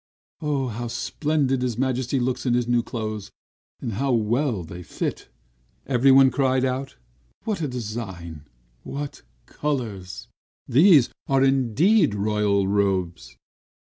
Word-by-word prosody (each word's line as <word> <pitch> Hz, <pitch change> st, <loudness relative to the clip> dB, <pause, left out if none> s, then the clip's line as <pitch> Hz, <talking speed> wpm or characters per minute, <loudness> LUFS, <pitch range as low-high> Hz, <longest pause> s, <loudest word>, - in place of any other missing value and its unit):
"How 130 Hz, -6 st, -2 dB
splendid 140 Hz, +1 st, -1 dB
his 125 Hz, -3 st, -2 dB
Majesty 130 Hz, 0 st, 0 dB
looks 125 Hz, +1 st, -2 dB
in 120 Hz, -, +3 dB
his 120 Hz, -1 st, 0 dB
new 120 Hz, 0 st, +3 dB
clothes, 110 Hz, -3 st, -5 dB, 0.5 s
and 115 Hz, -, -4 dB
how 135 Hz, +6 st, 0 dB
well 115 Hz, -, 0 dB
they 85 Hz, +2 st, -9 dB
fit!" -, -, -5 dB, 0.6 s
everyone 135 Hz, +1 st, +5 dB
cried 130 Hz, 0 st, +1 dB
out. 130 Hz, +1 st, -3 dB, 0.5 s
"What 210 Hz, -6 st, -2 dB
a 150 Hz, -, 0 dB
design! 100 Hz, -, -6 dB, 0.3 s
What 145 Hz, 0 st, -6 dB, 0.2 s
colors! 115 Hz, -11 st, -4 dB, 0.4 s
These 150 Hz, -1 st, +6 dB, 0.2 s
are 135 Hz, -1 st, +3 dB
indeed 135 Hz, -, +3 dB
royal 105 Hz, -1 st, +1 dB
robes!" 95 Hz, -4 st, -1 dB
125 Hz, 115 wpm, -24 LUFS, 105-135 Hz, 0.6 s, These